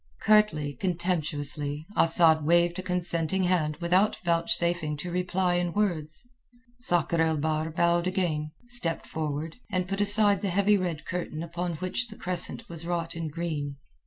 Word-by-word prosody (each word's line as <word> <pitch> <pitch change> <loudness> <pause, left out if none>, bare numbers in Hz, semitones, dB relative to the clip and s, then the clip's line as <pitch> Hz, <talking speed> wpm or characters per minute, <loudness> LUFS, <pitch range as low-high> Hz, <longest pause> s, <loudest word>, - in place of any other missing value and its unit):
Curtly, 210 -10 +3
contemptuously, 150 -3 -2
Asad 165 -1 +4
waved 170 +3 +3
a - - -1
consenting 180 0 -1
hand 165 -4 +1
without 180 +5 +2
vouchsafing 170 -2 +1
to 175 +4 -5
reply 180 0 0
in 175 -1 -1
words. 175 -2 -1 0.5
Sakr 175 - +1
el 160 -1 +2
Bahr 155 +1 -1
bowed 170 +2 +2
again, 170 -5 -1 0.2
stepped 240 -9 -2
forward, 155 +2 -4
and 185 -3 -1
put 195 +1 -2
aside 205 -1 +4
the 200 - -1
heavy 200 +3 +3
red 175 -5 -2
curtain 170 -3 -4
upon 170 +1 -3
which 185 +9 -2
the 215 - -10
crescent 180 0 -1
was 165 -1 -5
wrought 170 -1 -2
in 165 -1 -3
green. 150 -3 -3
170 Hz, 150 wpm, -27 LUFS, 155-185 Hz, 0.5 s, Asad